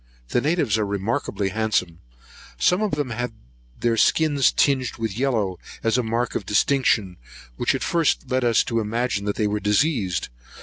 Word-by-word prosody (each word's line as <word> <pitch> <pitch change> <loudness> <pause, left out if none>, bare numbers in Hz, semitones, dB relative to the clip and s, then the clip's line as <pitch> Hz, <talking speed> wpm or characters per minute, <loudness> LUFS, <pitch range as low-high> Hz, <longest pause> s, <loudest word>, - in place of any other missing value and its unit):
The 120 - +1
natives 145 -8 +1
are - - +1
remarkably 100 0 -2
handsome. 100 -5 -1 0.6
Some 180 +2 +2
of 215 -2 -1
them 145 -4 -2
had 120 +1 -3 0.5
their 115 -1 +1
skins 145 +1 +3
tinged 130 -3 +1
with 110 -4 -3
yellow, 110 -8 0 0.2
as 115 0 +2
a 125 - +3
mark 115 +1 -1
of - - -2
distinction, 105 -4 +1 0.4
which - - +1
at - - -3
first 165 -3 +1
led 130 -1 0
us 120 -2 +3
to 115 -1 -1
imagine 105 -2 -1
they 110 - +1
were 105 0 0
diseased. 105 - 0
115 Hz, 165 wpm, -23 LUFS, 105-130 Hz, 0.6 s, skins